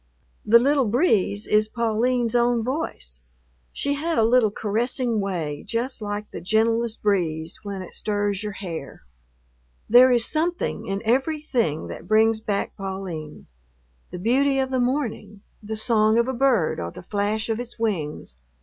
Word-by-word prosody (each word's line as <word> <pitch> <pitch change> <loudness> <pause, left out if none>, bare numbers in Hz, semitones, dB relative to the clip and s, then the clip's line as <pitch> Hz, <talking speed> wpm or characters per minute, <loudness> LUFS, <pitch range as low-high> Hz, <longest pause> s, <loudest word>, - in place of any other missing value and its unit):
The 230 +2 +7
little 275 +2 +3
breeze 210 - +1
is 215 0 +2
Pauline's 235 +1 0
own 240 -1 +2
voice; 220 - -4 0.5
she 285 - -1
had 320 +3 -2
a 225 - +4
little 230 -1 +4
caressing 230 +3 -1
way 170 -7 -3
just 240 +1 -3
like 205 0 -4
the - - -7
gentlest 225 +4 +1
breeze 165 -6 -1
when 200 -2 -5
it 180 - -12
stirs 205 -2 -1
your 210 -1 -4
hair. 170 -8 -7 0.8
There 250 +3 +7
is 240 -2 +3
something 340 +3 -2
in 195 +1 -3
everything 255 - 0
that - - -8
brings 220 +1 +3
back 205 -2 -2
Pauline: 190 -6 -6 0.6
the - - -7
beauty 270 +8 +2
of 265 -1 0
the 260 - +1
morning, 245 -6 -2 0.2
the 220 +1 -5
song 220 -1 +3
of 235 +1 +2
a 260 - -1
bird 245 -9 +2
or 85 - -3
the - - -11
flash 205 +3 -1
of 225 0 -1
its 245 0 -7
wings. 155 - -3
220 Hz, 155 wpm, -24 LUFS, 200-245 Hz, 0.8 s, The